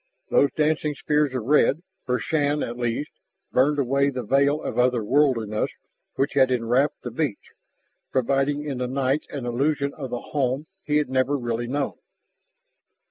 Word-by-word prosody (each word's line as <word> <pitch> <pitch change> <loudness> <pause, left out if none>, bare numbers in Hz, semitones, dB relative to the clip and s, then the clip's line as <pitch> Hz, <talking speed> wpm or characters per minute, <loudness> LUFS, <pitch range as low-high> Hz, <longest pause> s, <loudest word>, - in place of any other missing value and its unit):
Those 140 - +4
dancing 155 -1 +1
spears 150 0 +1
of 125 - -2
red, 150 +5 +3 0.2
for 125 0 +2
Shann 145 0 0
at 120 - -4
least, 120 +4 -2 0.4
burned 145 +4 +3
away 140 +1 +2
that 125 -2 -4
veil 140 +5 +2
of - - -3
other 125 -2 +3
worldliness 115 -5 +2 0.5
which 135 - 0
had 135 -2 +4
enwrapped 125 +3 +1
the 120 - -5
beach, 125 -4 -3 0.6
providing 135 +3 +1
in 140 -4 -3
the 125 - -1
night 135 +2 0
an 140 -4 -5
illusion 140 +3 0
of 135 -4 -6
the 120 0 -4
home 135 0 0 0.2
he 150 -4 +1
had 150 -3 0
never 130 +2 +2
really 120 -1 -2
known. 140 +2 -2
135 Hz, 160 wpm, -24 LUFS, 125-145 Hz, 0.6 s, Those